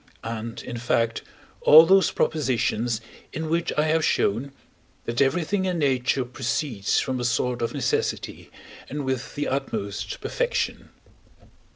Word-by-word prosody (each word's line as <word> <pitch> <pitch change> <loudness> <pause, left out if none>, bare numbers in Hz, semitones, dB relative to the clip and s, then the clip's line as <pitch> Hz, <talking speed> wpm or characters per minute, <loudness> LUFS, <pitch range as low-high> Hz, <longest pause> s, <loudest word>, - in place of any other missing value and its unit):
and, 115 0 -5
in 120 -1 -6
fact, 115 -1 0 0.4
all 160 +2 +9
those 190 +2 +5
propositions 120 -5 0 0.3
in 160 +1 -4
which 170 0 0
I 150 - +4
have 155 +1 +2
shown, 120 +4 +1 0.5
that 115 +2 -1
everything 175 +8 +1
in 180 -2 -1
nature 130 -3 +1
proceeds 125 -3 -1
from 130 -1 -2
a - - -2
sort 120 +1 0
of 115 - -2
necessity, - - -2 0.4
and 145 0 -4
with 130 -1 -3
the 145 - -2
utmost 130 -7 -3
perfection. - - -2
130 Hz, 135 wpm, -25 LUFS, 120-155 Hz, 0.5 s, all